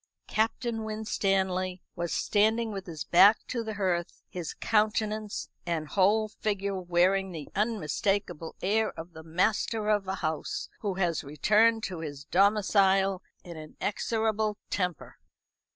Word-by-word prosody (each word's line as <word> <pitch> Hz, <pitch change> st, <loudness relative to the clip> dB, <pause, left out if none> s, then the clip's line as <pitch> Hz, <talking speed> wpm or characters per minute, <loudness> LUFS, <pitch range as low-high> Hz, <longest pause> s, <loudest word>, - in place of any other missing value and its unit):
Captain 225 Hz, +1 st, -1 dB
Winstanley 190 Hz, -4 st, -1 dB
was 170 Hz, -2 st, -3 dB
standing 220 Hz, +4 st, +2 dB
with 195 Hz, -2 st, -6 dB
his 160 Hz, -4 st, -5 dB
back 195 Hz, +5 st, +7 dB
to 235 Hz, -2 st, -3 dB
the 220 Hz, -1 st, -5 dB
hearth, 180 Hz, -4 st, -2 dB
his 175 Hz, -3 st, -6 dB
countenance 215 Hz, -1 st, 0 dB
and 165 Hz, -3 st, -2 dB
whole 210 Hz, +3 st, +3 dB
figure 200 Hz, -2 st, -2 dB
wearing 185 Hz, +2 st, +2 dB
the 160 Hz, -4 st, -7 dB
unmistakable 195 Hz, -4 st, -1 dB
air 215 Hz, +3 st, +2 dB
of 165 Hz, +1 st, -8 dB
the 160 Hz, -, -9 dB
master 210 Hz, +6 st, 0 dB
of 205 Hz, -2 st, +1 dB
a 190 Hz, -, -1 dB
house 155 Hz, -4 st, -3 dB
who 200 Hz, -3 st, -2 dB
has 175 Hz, -3 st, 0 dB
returned 215 Hz, +10 st, +3 dB
to 180 Hz, -3 st, -4 dB
his 145 Hz, -3 st, -6 dB
domicile 195 Hz, 0 st, +3 dB, 0.2 s
in 170 Hz, -2 st, -9 dB
an 155 Hz, -1 st, -11 dB
execrable 220 Hz, 0 st, 0 dB
temper. 180 Hz, -5 st, -3 dB
195 Hz, 135 wpm, -28 LUFS, 175-215 Hz, 0.2 s, back